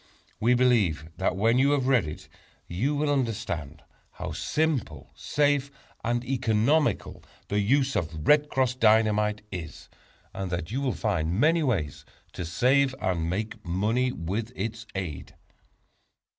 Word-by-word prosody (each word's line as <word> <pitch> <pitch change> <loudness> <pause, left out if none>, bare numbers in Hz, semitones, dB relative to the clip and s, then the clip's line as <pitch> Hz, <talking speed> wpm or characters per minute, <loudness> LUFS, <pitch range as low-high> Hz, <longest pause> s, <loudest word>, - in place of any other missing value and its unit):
We 120 +3 +3
believe 105 -11 +2
that 95 -1 0
when 115 +5 +3
you 140 +2 +4
have 135 -3 +1
read 125 -11 +3
it 75 - -8 0.4
you 130 +12 -1
will 145 0 +1
understand 85 - -3 0.3
how - - -6
simple, 145 - -2
safe 145 -1 +1 0.3
and 120 +1 -1
economical 125 +4 +1 0.3
the 105 - +1
use 135 +6 +2
of 80 -4 -3
"Red 150 0 +5
Cross" 130 -2 0
Dynamite 105 -2 +3
is, 90 -3 -7 0.4
and 95 -1 -4
that 85 -1 -4
you 130 +4 -1
will 135 -3 -1
find 90 -4 -1
many 160 +5 +4
ways 100 - -1 0.3
to 90 - -5
save 130 - +2
and 85 -3 -1
make 105 +5 -4
money 110 +9 0
with 105 +5 -4
its 115 +3 -4
aid. 90 -7 -5
110 Hz, 140 wpm, -27 LUFS, 90-130 Hz, 0.4 s, Red